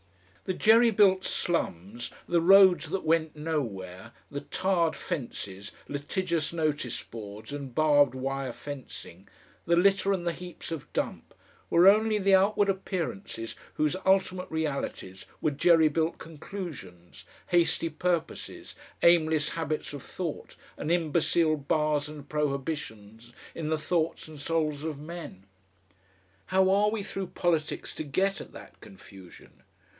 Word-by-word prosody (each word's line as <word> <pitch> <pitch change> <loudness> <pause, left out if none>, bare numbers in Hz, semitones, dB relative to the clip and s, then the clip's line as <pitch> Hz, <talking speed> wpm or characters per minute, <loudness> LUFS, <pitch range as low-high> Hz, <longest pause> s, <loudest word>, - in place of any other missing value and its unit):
The 185 - -2
jerry 230 +2 +6
built 195 -3 +4
slums, 115 - -2 0.2
the 170 -1 +2
roads 190 0 +6
that 195 - -2
went 160 -1 +1
nowhere, 110 - -4 0.2
the 140 0 -4
tarred 170 0 0
fences, 100 - -5 0.2
litigious 160 +2 -2
notice 155 -6 -1
boards 110 +3 -9
and 140 -3 -6
barbed 145 -2 +4
wire 135 0 -3
fencing, 145 +1 -9 0.4
the 170 - +3
litter 195 +2 +3
and 185 -3 -1
the 170 - +1
heaps 180 -1 -9
of 160 -4 -6
dump, - - -4 0.3
were 175 +2 +6
only 215 +2 +5
the 195 -1 +2
outward 200 +2 +3
appearances 190 - -3 0.2
whose 155 +2 +1
ultimate 185 -1 +2
realities 140 -11 -4
were 155 - +1
jerry 160 +2 +5
built 160 +2 0
conclusions, 150 - -9 0.2
hasty 170 -1 +2
purposes, 170 +1 -3 0.3
aimless 160 -3 +4
habits 155 -3 -3
of 145 - -6
thought, 170 +1 -6 0.2
and 155 - -3
imbecile 165 -1 +2
bars 150 0 0
and 150 -2 -10
prohibitions 135 -7 -4 0.2
in 155 -2 -4
the 160 - +1
thoughts 160 +1 -1
and 155 -2 -10
souls 155 -2 -1
of 155 -3 -3
men. 150 - -9 1.0
How 190 0 +3
are 205 +2 +4
we 215 -1 -3
through 195 -2 -4
politics 170 -3 -1
to - - -4
get 190 +7 0
at - - -11
that - - -13
confusion? 95 -1 -15
160 Hz, 130 wpm, -28 LUFS, 140-180 Hz, 1.0 s, jerry